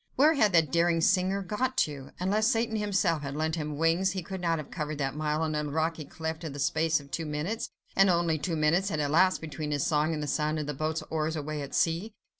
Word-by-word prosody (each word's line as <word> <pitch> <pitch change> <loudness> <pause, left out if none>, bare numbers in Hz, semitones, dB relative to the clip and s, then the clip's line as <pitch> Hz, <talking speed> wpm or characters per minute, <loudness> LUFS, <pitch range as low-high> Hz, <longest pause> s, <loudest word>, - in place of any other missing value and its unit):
Where 300 +4 +5
had 215 -9 +3
that 160 -5 +4
daring 170 0 +3
singer 190 +3 +2
got 255 +7 -2
to? 140 -3 -8
Unless 205 +4 +2
Satan 230 -1 +1
himself 195 -6 +1
had 140 -1 -5
lent 160 +1 -1
him 150 -2 -3
wings, 170 +4 +2
he 185 -2 -4
could 190 +1 -6
not 165 -2 +1
have 155 - -7
covered 150 -3 -4
that 135 -2 -1
mile 155 +1 -1
on 155 -1 -1
a 150 0 -1
rocky 160 +1 -1
cliff 160 +2 -5
in 155 -4 -5
the - - -7
space 160 +3 +1
of 140 -1 -15
two 165 -2 -3
minutes; 155 +9 -3 0.3
and 195 0 +5
only 170 -3 +2
two 170 +2 -2
minutes 165 +6 +2
had 155 - -2
elapsed 165 +6 +3
between 155 -1 -5
his 145 -2 0
song 150 +1 +2
and 150 -2 -2
the - - -2
sound 150 +2 0
of 150 - -2
the 150 - -3
boat's 155 +3 -2
oars 160 0 -1
away 155 0 -4
at 140 -1 -6
sea. 175 +5 +1
160 Hz, 240 wpm, -29 LUFS, 150-185 Hz, 0.3 s, Where